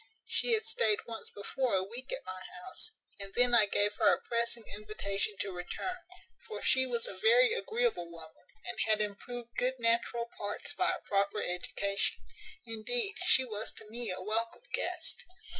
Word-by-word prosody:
She 480 - +1
had 445 0 +2
staid 220 - +2
once 225 -3 -7
before 240 +3 -1
a 190 - +2
week 240 +7 -7
at - - -4
my 185 0 -6 0.2
house, 370 +4 -4 0.3
and 195 0 -5
then 245 0 +5
I 215 -3 +7
gave 205 +1 +2
her 215 -3 +6
a - - +2
pressing 235 0 -1
invitation 210 0 -2
to 195 - -2
return; 185 - -4 0.5
for 435 - -6
she 260 0 +5
was 235 -2 -1
a - - -4
very 470 0 +6
agreeable 470 - 0
woman, 165 +1 -12 0.2
and 240 - -4
had 215 -1 +4
improved 235 +3 -4
good 255 +1 +2
natural 235 0 +1
parts 205 0 -3
by - - +2
a - - -6
proper 200 +1 +2
education. 200 +3 0 0.5
Indeed, 390 - 0
she 265 -8 +6
was 215 -2 -3
to - - -7
me 235 +1 -2
a 185 0 -3
welcome 225 - -1
guest. - - -2
230 Hz, 175 wpm, -32 LUFS, 200-260 Hz, 0.5 s, I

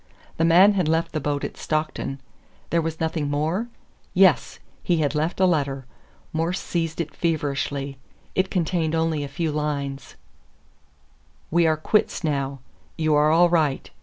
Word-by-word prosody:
The 165 - +2
man 180 +5 +7
had 185 -5 +1
left 160 +1 +1
the 155 - -2
boat 145 0 -2
at - - -5
Stockton. 155 -3 -2 0.5
There 170 - +3
was 160 0 -4
nothing 160 -2 -1
more? 160 +10 -1 0.5
Yes! - - +4 0.2
he 175 - +1
had 145 -3 +1
left 155 +4 -1
a 190 - +5
letter. 140 -6 0 0.5
Morse 165 +4 -1
seized 165 -1 -3
it 160 -2 -3
feverishly. 140 -4 -2 0.3
It 190 0 +1
contained 165 -2 0
only 160 -2 0
a - - -4
few 155 +3 -2
lines: 140 -2 -3 1.4
We 170 0 +4
are 155 -1 +2
quits 195 +4 +1
now. 140 -3 -2 0.4
You 155 -1 +1
are 150 +1 +4
all 170 +2 +5
right. 155 -5 +1
155 Hz, 155 wpm, -24 LUFS, 145-170 Hz, 1.4 s, man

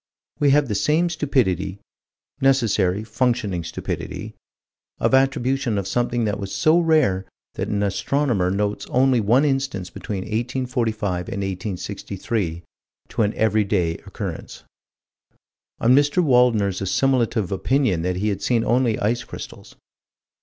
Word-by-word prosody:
We 145 -2 +4
have 145 0 +4
the 110 - -2
same 150 +12 +2
stupidity 100 - 0 0.6
necessary, 110 -7 +2
functioning 110 -5 -1
stupidity 85 - -5 0.6
of - - 0
attribution 130 -3 +2
of 100 -1 -2
something 120 +2 0
that 105 -1 -1
was 100 -1 -5
so 160 +2 +3
rare 155 - +2 0.3
that - - -3
an 100 0 -1
astronomer 100 -1 0
notes 100 +2 -2
only 130 -1 +3
one 120 +7 +3
instance 135 -10 -1
between 100 -3 -5
1845 115 0 -2 0.2
and 100 - -3
1863, 95 -1 -4 0.5
to - - -2
an 105 0 +1
every 110 -1 +2
day 90 -5 0
occurrence - - -7 1.2
Or - - 0
Mr. 145 +7 +4
Waldner's 120 - +3
assimilative 115 -1 +1
opinion 110 - +1
that 90 +1 -1
he 105 +4 0
had 100 -1 -3
seen 115 +1 +1
only 120 -1 +2
ice 120 +4 0
crystals. - - -10
110 Hz, 130 wpm, -22 LUFS, 100-130 Hz, 1.2 s, We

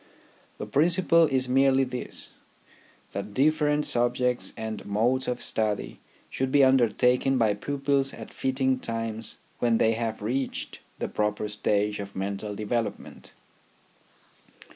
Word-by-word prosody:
The - - -5
principle 170 +2 +3
is 130 -3 0
merely 135 +1 +4
this 125 -1 -6 0.8
that 100 +1 -6
different 150 +1 +2
subjects 125 +1 0
and 110 -1 -5
modes 120 +6 0
of 125 0 -1
study 110 -2 0 0.3
should 130 0 -2
be 140 0 +5
undertaken 125 +1 +3
by 110 -3 +3
pupils 140 +3 0
at - - -10
fitting 130 0 0
times 115 -2 -4 0.2
when 120 -2 +2
they 110 - +3
have 115 -2 -3
reached 130 +5 -3 0.2
the - - -3
proper 105 0 -1
stage 105 0 0
of 100 0 -7
mental 100 +2 -4
development. 110 +2 -4
125 Hz, 120 wpm, -27 LUFS, 105-135 Hz, 0.8 s, be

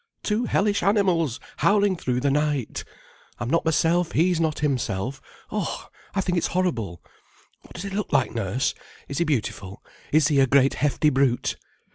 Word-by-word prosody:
Two 220 +3 0
hellish 205 0 +1
animals 175 - +2 0.2
howling 200 -1 +3
through 125 -6 -2
the 140 +1 +2
night! 145 -4 -1 0.5
I'm 120 +3 -3
not 165 - +2
myself, 165 +2 +2
he's 175 +1 +2
not 160 -2 0
himself. 130 -4 -1 0.3
Oh, - - -3 0.3
I 195 - +2
think 180 -2 0
it's - - 0
horrible. 115 - -1 0.6
What - - -16
does 175 - -5
he 200 - -5
look 200 0 -3
like, 135 -5 +2
Nurse? 115 +3 -1 0.3
Is 140 - -4
he 170 - +2
beautiful? 105 - -3 0.3
Is 155 0 +4
he 145 -2 +3
a 135 - +5
great 135 +1 +4
hefty 150 +1 +1
brute?" 130 -2 +1
150 Hz, 165 wpm, -24 LUFS, 130-180 Hz, 0.6 s, a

